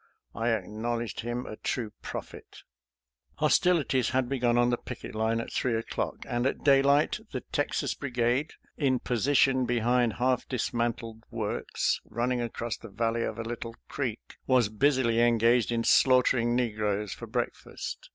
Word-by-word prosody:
I 115 +1 -1
acknowledged 115 +2 -2
him 120 +2 -3
a 110 - -7
true 115 -4 -3
prophet. - - -8 0.7
Hostilities 145 -8 +2
had 130 -1 +1
begun 120 -2 +1
on 120 0 +4
the 120 - +1
picket 125 - -8
line 110 +1 0
at 115 - -5
three 125 -3 0
o'clock, 115 - -3
and 120 +2 0
at - - -3
daylight 140 +1 +4
the - - -3
Texas - - 0
Brigade, 125 +2 -1 0.2
in 135 -4 +2
position 130 +1 +2
behind 120 0 +2
half 125 0 0
dismantled 115 -2 -2
works 110 -3 -1
running 120 +3 -1
across 115 0 -3
the 115 - -11
valley 115 +3 -1
of - - -3
a 115 - -3
little 115 0 -6
creek, - - -4
was 125 -5 +4
busily 120 0 +2
engaged 120 0 +3
in 115 -1 0
slaughtering 125 -2 +4
negroes 105 -4 -1
for - - -9
breakfast. - - -4
120 Hz, 145 wpm, -28 LUFS, 115-125 Hz, 0.7 s, on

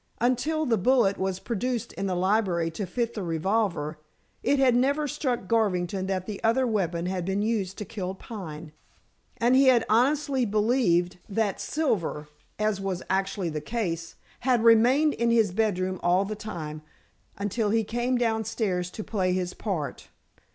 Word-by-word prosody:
Until 270 +6 +1
the 230 -6 +2
bullet 220 -2 +3
was 190 -1 -1
produced 240 +2 -3
in 195 - -3
the 185 - -1
library 180 -3 +1
to 195 +4 -4
fit 235 +5 -2
the 210 - -4
revolver 170 -2 -1 0.4
it 285 - +2
had 260 -3 +4
never 280 +4 +2
struck 255 -8 -2
Garvington 190 -4 0
that 185 -1 -2
the 205 -1 -6
other 230 +4 +3
weapon 180 -7 -1
had 185 -1 -2
been 195 +3 -1
used 205 -4 -1
to 210 - -5
kill 190 -2 -5
Pine. 165 -8 -8 0.7
And 240 +2 +3
he 270 +1 +6
had 250 -3 +5
honestly 270 +4 +2
believed 205 -5 +2
that 205 -1 -1
Silver 195 - -1 0.3
as 215 -2 0
was 190 -2 -3
actually 195 -1 0
the 155 -1 -4
case 170 -8 -3 0.2
had 245 -2 +2
remained 250 +7 +5
in 235 0 0
his 225 -4 +3
bedroom 185 -3 0
all 180 +3 +3
the 215 +2 -4
time, 160 -8 -6 0.6
until 205 +2 -1
he 225 +1 +2
came 240 +4 -1
downstairs 220 -6 -1
to 215 - -7
play 185 -4 0
his 180 -1 -2
part. 175 -9 -4
210 Hz, 160 wpm, -27 LUFS, 185-235 Hz, 0.7 s, he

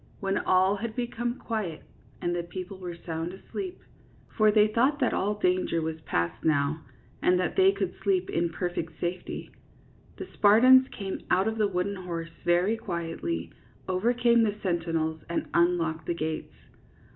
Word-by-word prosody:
When 195 0 0
all 185 +2 +3
had 220 +2 -5
become 240 0 -2
quiet, 210 -9 -4 0.4
and 175 0 0
the 175 - 0
people 185 +3 -7
were 175 -2 -6
sound 165 0 -5
asleep, 365 - -7 0.3
— - - -28
for 215 -2 +5
they 210 0 +5
thought 250 +7 +2
that 255 -5 +1
all 205 +2 0
danger 180 -3 +1
was 160 0 -3
past 85 - -2
now 155 0 +1 0.4
and 180 0 +3
that 180 - -1
they 380 0 +6
could 400 - -2
sleep 380 -2 +1
in 170 0 +1
perfect 170 -1 -4
safety, 175 +1 -4 0.3
— - - -29
the - - -5
Spartans 255 +5 +7
came 195 -6 -5
out 190 +3 +3
of 220 0 -2
the 210 - +4
wooden 195 +1 -2
horse 170 -3 -5
very 180 +6 +2
quietly, 170 - -4 0.4
over 185 +6 +1
came 235 -1 +4
the 210 -2 +1
sentinels, 165 -3 -1
and 170 - -1
unlocked 170 -2 +1
the 175 - 0
gates. 160 -1 -4
185 Hz, 170 wpm, -28 LUFS, 170-220 Hz, 0.4 s, Spartans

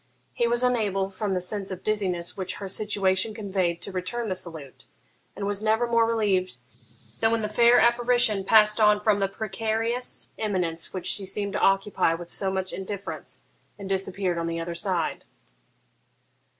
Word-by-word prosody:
He 235 - +1
was 240 +1 +1
unable, 205 -6 0
from 195 +1 -2
the 185 - 0
sense 195 +2 -2
of 185 -1 -6
dizziness 185 -5 0
which 185 -2 -4
her 200 - -6
situation 200 +1 0
conveyed, 185 -5 -2
to 195 - -3
return 215 +5 -3
the 185 - -1
salute; 165 -7 -6 0.5
and 200 - -4
was 205 0 -1
never 220 +2 +2
more 230 -1 +2
relieved 200 - 0 0.6
than 225 - +3
when 230 -1 0
the - - 0
fair 235 +3 +5
apparition 235 -3 +3
passed 210 +1 +5
on 210 -1 +5
from 210 -1 +2
the 195 - +1
precarious 225 +4 -3
eminence 180 -6 -1
which 185 - -6
she 195 -2 +2
seemed 200 +1 0
to - - -1
occupy 195 -4 +2
with 170 +1 -6
so 195 - +2
much 190 0 -3
indifference, 200 +1 -6 0.3
and 200 -1 -8
disappeared 190 -2 -1
on 165 - -2
the 165 0 -3
other 170 +1 -4
side. 170 -1 -1
200 Hz, 170 wpm, -25 LUFS, 185-220 Hz, 0.6 s, fair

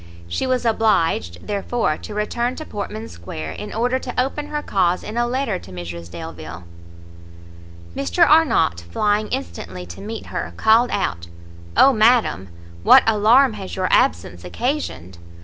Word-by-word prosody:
She 175 - -2
was 255 -1 0
obliged, 165 - +1
therefore, 205 -4 -1
to 210 - -9
return 235 +4 -1
to 310 - -7
Portman 215 0 -6
square, 80 -2 -7
in 210 - -7
order 245 +4 0
to 250 -1 -5
open 275 +3 -1
her 295 0 -4
cause 180 -2 +1
in 215 - -7
a 240 0 +1
letter 245 -6 -1
to 95 - -13
Mrs 85 -1 -7
Delvile. 80 0 -8 1.3
Mr 90 -2 +2
Arnott, 305 - +3
flying 210 - +1
instantly 90 +1 -5
to 85 +1 -10
meet 225 +2 -6
her, - - -4
called 225 +3 +4
out, 85 0 -2 0.5
"O 275 - +7
madam, 220 - +3 0.3
what - - +7
alarm 225 +4 +4
has 195 -3 -7
your 185 -1 -1
absence 85 +2 +1
occasioned! 95 - -4
205 Hz, 150 wpm, -21 LUFS, -, 1.3 s, O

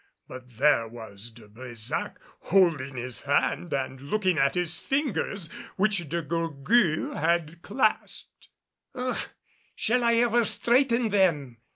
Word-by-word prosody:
But 125 -2 -12
there 140 -4 +3
was 110 -2 -10
De 110 -1 -16
Brésac 115 0 -4 0.2
holding 160 -8 +2
his 125 0 -4
hand 145 +4 0
and 130 -1 -3
looking 185 +2 0
at 135 0 +2
his 175 -2 0
fingers, 210 - -1 0.3
which 195 -6 0
De 170 +2 -2
Gourgues 165 - +1
had 170 +1 0
clasped. 215 +2 -2 0.5
"Ugh! 255 0 -2 0.5
Shall 245 +2 +1
I 235 0 +3
ever 235 0 +3
straighten 235 +2 +2
them?" 160 - +1
165 Hz, 125 wpm, -27 LUFS, 130-215 Hz, 0.5 s, there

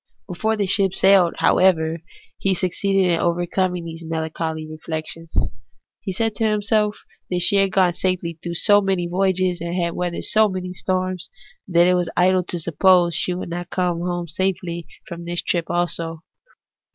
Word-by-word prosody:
Before 220 +4 -1
the 205 - +1
ship 190 0 +1
sailed, 190 -3 +4
however, 165 -3 +3 0.4
he 195 -1 +1
succeeded 190 +1 +1
in 165 - +1
overcoming 175 +1 0
these 165 0 -8
melancholy 160 0 -3
reflec 155 0 -5
tions. 165 0 -8 0.7
He 190 - -4
said 225 +4 -1
to - - -1
himself 210 0 0 0.3
that 180 -1 0
she 200 - +4
had 195 -1 +3
gone 185 -2 +3
safely 175 -2 -2
through 170 -1 -5
so 205 +4 +4
many 190 -3 0
voyages 185 -1 0
and 170 0 -2
weathered 175 -1 -3
so 220 -1 +3
many 185 -1 -5
storms 185 -1 -2 0.4
that 175 -1 +4
it 180 - +4
was 180 -1 0
idle 185 +1 +4
to 175 - -4
suppose 175 +1 +3
she 180 - -1
would 180 - -5
not 175 +1 -5
come 175 -1 -1
safely 180 0 -2
home 170 -1 -8 0.2
from 170 -1 -8
this 175 0 -2
trip 170 -2 0
also. 170 -2 -2
180 Hz, 165 wpm, -21 LUFS, 170-190 Hz, 0.7 s, sailed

